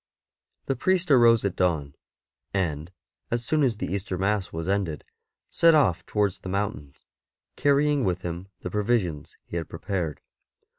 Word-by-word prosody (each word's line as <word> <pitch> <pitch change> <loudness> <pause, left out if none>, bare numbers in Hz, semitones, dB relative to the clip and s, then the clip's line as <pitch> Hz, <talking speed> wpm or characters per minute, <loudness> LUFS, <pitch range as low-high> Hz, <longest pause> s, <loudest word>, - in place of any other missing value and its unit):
'' - - -57
The 135 - 0
priest 180 +4 +1
arose 115 -4 +6
at 100 - -1
dawn, 80 -6 0 0.6
and, 80 -3 -1 0.4
as 120 0 -2
soon 155 +4 +1
as 125 -6 +2
the - - -3
Easter 100 -1 -3
Mass 100 +1 0
was 80 +1 -4
ended, 95 -6 -1 0.5
set 165 -1 +5
off 120 - +3
towards 100 -2 0
the 95 - -7
mountains, 95 -8 -4 0.5
carrying 145 0 +3
with 90 -2 -1
him 85 +2 -5
the 90 - -5
pro 105 - 0
visions 100 -10 -1
he 85 - -5
had 85 - -4
prepared. 80 -2 -3
100 Hz, 160 wpm, -26 LUFS, 85-120 Hz, 0.6 s, arose